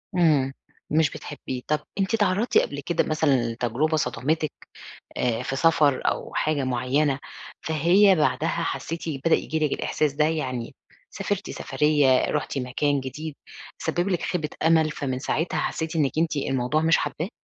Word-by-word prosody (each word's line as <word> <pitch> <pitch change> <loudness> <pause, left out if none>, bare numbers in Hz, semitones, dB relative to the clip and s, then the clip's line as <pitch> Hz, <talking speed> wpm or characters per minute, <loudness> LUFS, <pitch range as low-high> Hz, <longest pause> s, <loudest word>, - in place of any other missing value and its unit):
إمم، 145 -6 +3 0.4
مش 155 -1 +3
بتحبيه. 130 -4 -7
طَب 150 0 +1 0.2
أنتِ 195 +2 0
اتعرضتِ 205 +1 +2
قبل 140 - +1
كده 175 - +1
مثلًا 140 -7 +1
لتجربة 125 +7 0
صدمتِك 145 +4 -1 0.7
آآ 120 -2 0
في 135 - -3
سفر 150 -3 +3
أو - - -1
حاجة 150 -2 0
معينة، 130 +3 +1 0.4
فهي 175 +6 +4
بعدها 155 0 +1
حسيتِ 165 0 -3 0.2
بدأ 165 - +5
ييجي 160 0 -2
لِك 150 -2 +1
الإحساس 150 -2 0
ده؟ 150 +1 +2
يعني 130 -7 -2 0.3
سافرتِ - - -3
سفرية، 145 -4 +2
رُحتِ 150 -1 -2
مكان 135 +2 0
جديد، 145 +4 -6 0.4
سبِب 175 +3 -1
لِك 180 - 0
خيبة 155 -4 -2
أمل، 160 -1 +4
فمن 130 -4 -3
ساعتها 160 +5 -1
حسيتِ 160 +1 -2
إنِك 145 -4 +2
أنتِ 165 -1 +1
الموضوع 135 +1 0
مش 165 0 +4
حاباه؟ 165 +5 -3
150 Hz, 150 wpm, -25 LUFS, 135-160 Hz, 0.7 s, بدأ